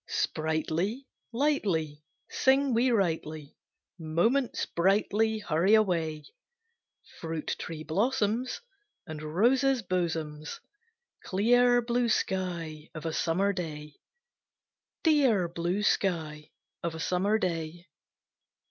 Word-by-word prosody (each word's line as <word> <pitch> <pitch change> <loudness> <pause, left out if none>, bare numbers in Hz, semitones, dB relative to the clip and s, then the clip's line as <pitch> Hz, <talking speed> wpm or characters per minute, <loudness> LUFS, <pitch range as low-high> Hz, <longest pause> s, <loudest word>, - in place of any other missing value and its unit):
Sprightly, 160 - -1 0.3
lightly, 195 - 0 0.2
Sing 270 0 +2
we 240 +3 +3
rightly, 160 - -1 0.4
Moments 175 - +1
brightly 210 +4 +1
hurry 190 0 +3
away; 165 -7 0 0.9
Fruit 165 -2 -3
tree 160 -2 -6
blossoms, 225 - 0 0.4
And 155 -3 -7
roses' 240 - +2
bosoms, 160 -5 -3 0.6
Clear 245 +5 +3
blue 240 0 0
sky 170 -7 -2
of 155 0 -7
a 160 - -2
Summer 190 +6 +1
day! 150 -5 -6 1.0
Dear 265 - +3
blue 175 +4 -2
sky 160 -7 0 0.3
of 170 -1 -3
a - - -7
Summer 190 +6 +1
day! 170 -3 -3
180 Hz, 95 wpm, -29 LUFS, 160-225 Hz, 1.0 s, we